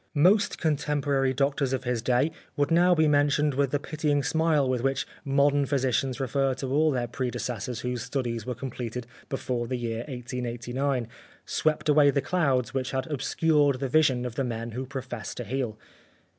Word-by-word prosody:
Most 195 +7 +4
contemporary 145 -3 +1
doctors 140 0 0
of 130 -1 -1
his 125 -2 -1
day 125 +6 +2 0.3
would 145 +1 +1
now 175 +2 +5
be 160 -1 +4
mentioned 145 0 +3
with 140 0 +1
the 145 - +1
pitying 145 0 -1
smile 155 0 +2
with 130 -2 0
which 135 0 0 0.2
modern 140 0 +3
physicians 130 -1 0
refer 135 0 0
to 130 0 -4
all 155 +2 +4
their 125 -4 0
predecessors 125 -2 -3
whose 125 -1 -3
studies 120 -3 -2
w^ere 125 -2 -4
com 135 0 -5
pleted 120 0 -5 0.3
before 125 -3 -2
the 125 +1 -2
year 115 -2 -3
1889 125 0 -3 0.4
swept 155 -1 0
away 150 -1 +6
the 140 - +2
clouds 135 -7 +1
which 130 -1 -1
had 130 -1 -2
obscured 145 0 +2
the 135 -1 -2
vision 130 -4 +3
of 125 - -4
the 135 - -1
men 115 -1 -4
who 130 +3 -5
profess 130 -4 -6
to 120 - -4
heal. 120 -1 -3
135 Hz, 175 wpm, -27 LUFS, 125-145 Hz, 0.4 s, away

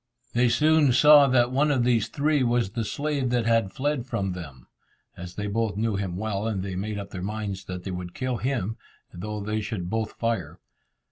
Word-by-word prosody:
They 120 0 +3
soon 150 +1 +4
saw 145 +2 +8
that 125 -1 +3
one 145 +3 +2
of 135 -4 +2
these 120 -3 +2
three 150 0 +1
was 120 -5 +1
the 115 +1 -2
slave 140 +3 -1
that 120 -1 +1
had 115 -4 +2
fled 135 +1 -2
from 95 -6 -2
them, 70 -9 -9 0.5
as 90 0 -9
they 105 - -3
both 105 0 -1
knew 110 -1 0
him 95 -3 -3
well, 105 0 -2
and 100 -4 -2
they 95 -2 -4
made 105 +3 -3
up 100 -1 -7
their 90 - -6
minds 100 -1 -4
that 90 -1 -6
they 95 - -5
would 90 -1 -6
kill 130 -2 -2
him, 115 -3 -2 0.4
though 105 +4 -5
they 105 +1 -2
should 100 -5 -4
both 110 -1 -2
fire. 115 -10 -2
110 Hz, 205 wpm, -26 LUFS, 95-125 Hz, 0.5 s, saw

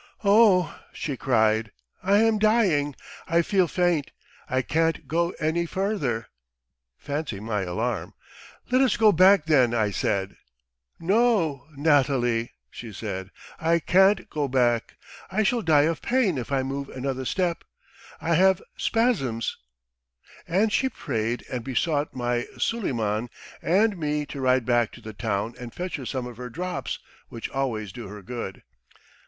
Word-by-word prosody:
'Oh,' 200 -3 +4
she 145 - -4
cried, 110 -4 +2 0.3
'I 195 +2 +3
am 225 -1 +3
dying! 190 - +2 0.3
I 170 +1 +3
feel 185 -1 +2
faint! 175 -4 +1 0.4
I 130 0 +1
can't 165 +4 0
go 170 +2 +1
any 165 +2 0
further' 160 - -1 0.7
Fancy 145 -7 -4
my 105 -1 -2
alarm! 110 +5 -3 0.6
'Let 255 +1 +4
us 265 - +3
go 220 -1 +6
back 185 -1 +5
then,' 130 -7 +4
I 105 -3 +1
said. 95 0 -1 0.6
'No, 175 - +2
Natalie,' 135 -6 +2 0.2
she 115 -2 -8
said, 95 -2 -5 0.3
'I 165 +1 +3
can't 190 +4 +4
go 150 -2 -1
back! 120 -3 +1 0.3
I 215 +3 +1
shall 235 +3 +1
die 155 -5 +4
of 165 +1 0
pain 230 - +1
if 125 - -6
I 135 -1 +1
move 135 +1 -4
another 130 0 -3
step! 175 +5 -1 0.6
I 170 - 0
have 190 +2 +4 0.2
spasms.' 155 - 0 0.9
And 205 +5 +2
she 265 - +2
prayed 115 - -3
and 125 -2 -4
besought 145 +3 -1
my 120 -1 -1
Suleiman 120 - -1 0.3
and 200 +2 +2
me 150 -1 -1
to 140 -1 -7
ride 130 -2 +2
back 120 -2 +2
to 120 - -12
the 110 -1 -8
town 105 +1 -2
and 120 -1 -7
fetch 180 +4 -4
her 130 -4 -7
some 130 -2 -3
of 120 -2 -9
her 125 0 -6
drops 180 +8 -4 0.3
which 115 - -6
always 115 -7 -2
do 120 -4 -8
her 105 0 -10
good." 115 -4 -6
140 Hz, 150 wpm, -25 LUFS, 120-180 Hz, 0.9 s, go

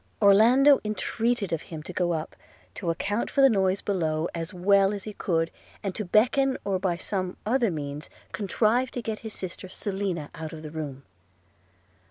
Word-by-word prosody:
Orlando 235 +8 +6
entreated 215 0 -1
of 165 - -1
him 155 -2 -8
to 180 - -8
go 175 -1 +1
up, 160 -1 -4 0.4
to 170 - -4
account 205 +6 -1
for 275 - +2
the 270 -1 +7
noise 190 -2 +1
below 160 -5 0
as 165 -1 -4
well 195 +2 +3
as 200 - -6
he 215 - -6
could, 165 -4 0 0.3
and 195 -2 -2
to 215 - -3
beckon, 255 +7 +3
or 195 -2 0
by 180 -2 0
some 185 -1 -3
other 235 +1 +2
means 150 -1 -5 0.2
contrive 220 +5 +1
to 245 - -4
get 220 -1 -3
his 220 -2 -7
sister 185 0 -7
Selina 190 -6 -3
out 160 -1 -7
of 155 -1 -8
the 155 - -7
room. 145 -4 -6
195 Hz, 180 wpm, -27 LUFS, 165-215 Hz, 0.4 s, the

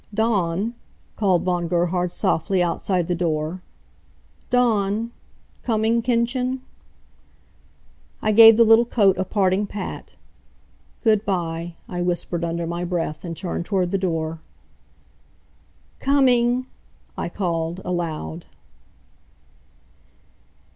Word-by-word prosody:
"Dawn!" 205 -1 0 0.4
called 190 -5 +2
Von 175 -2 0
Gerhard 175 +1 0
softly, 180 +2 +1
outside 175 0 -1
the 180 - 0
door. 165 0 -2 0.9
"Dawn! 230 -2 +1 0.5
Coming, 225 0 +1
Kindchen?" 250 +2 0 1.6
I 215 - +1
gave 225 +1 +9
the 235 - +7
little 225 +1 +6
coat 200 -5 +3
a - - +2
parting 195 0 +1
pat. 200 -1 -7 0.9
"Goodby," 175 -6 0
I 175 -1 -4
whispered, 175 -1 -2
under 170 0 -2
my 170 +1 -3
breath, 170 -3 -3
and 165 -3 -6
turned 175 -2 -4
toward 185 -3 0
the 195 - 0
door. 165 -3 -2 1.6
"Coming!" 255 -3 +3 0.5
I - - -3
called, 170 -2 -2
aloud. 160 - -4
185 Hz, 100 wpm, -22 LUFS, 170-225 Hz, 1.6 s, gave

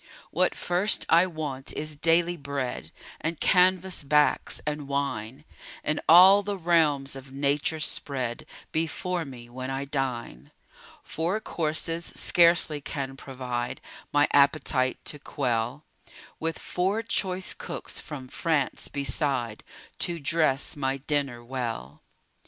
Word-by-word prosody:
What - - +2
first 180 +4 0
I 170 +3 +6
want 150 -6 -4
is 155 0 -3
daily 170 +3 +3
bread 140 -4 -4 0.3
And 160 0 -2
canvas 185 -1 +3
backs, 150 +1 +2
and 150 -1 -3
wine 140 -1 -3 0.4
And 150 0 0
all 185 +4 +9
the 200 0 -3
realms 155 -6 +2
of 135 0 -11
nature 140 +3 0
spread 130 -5 -1 0.2
Before 165 +2 -2
me, 125 -3 -10
when 130 +2 -6
I 135 +1 -3
dine. 120 - -4 0.5
Four 175 +6 -2
courses 165 -2 -1
scarcely 170 -4 +4
can 135 -2 -4
provide 125 -3 -4 0.3
My 145 +1 +4
appetite 140 -2 +3
to 145 - -4
quell; 125 0 -2 0.5
With 165 0 -2
four 195 +5 -1
choice 190 -4 +1
cooks - - -6
from 140 -4 -8
France 150 0 -1
beside, 140 -5 -2 0.4
To 170 -1 0
dress 150 -2 +2
my 135 -2 -1
dinner 140 -4 -2
well. 115 - -5
145 Hz, 120 wpm, -27 LUFS, 135-165 Hz, 0.5 s, all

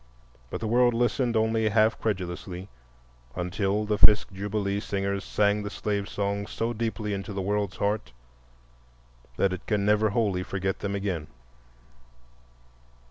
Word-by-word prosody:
But - - -5
the 110 - -1
world 120 +1 +4
listened 120 0 +1
only 110 0 +2
half 110 +1 +3
credulously 90 -2 -3 0.7
until 95 +4 0
the 105 0 0
Fisk 105 0 +6
Jubilee 100 +1 -2
Singers 100 -1 -2
sang 105 0 +2
the 105 - -4
slave 100 -1 -2
songs 100 0 -2
so 115 +1 -2
deeply 110 -2 -2
into 100 +2 -4
the 95 - -2
world's 100 -1 -1
heart 105 +1 -1 1.3
that 95 -1 +2
it 95 - -7
can 105 -2 +1
never 105 +1 +4
wholly 100 -4 +1
forget 95 +1 -2
them 100 0 -2
again. 95 -6 -2
105 Hz, 135 wpm, -27 LUFS, 100-110 Hz, 1.3 s, Fisk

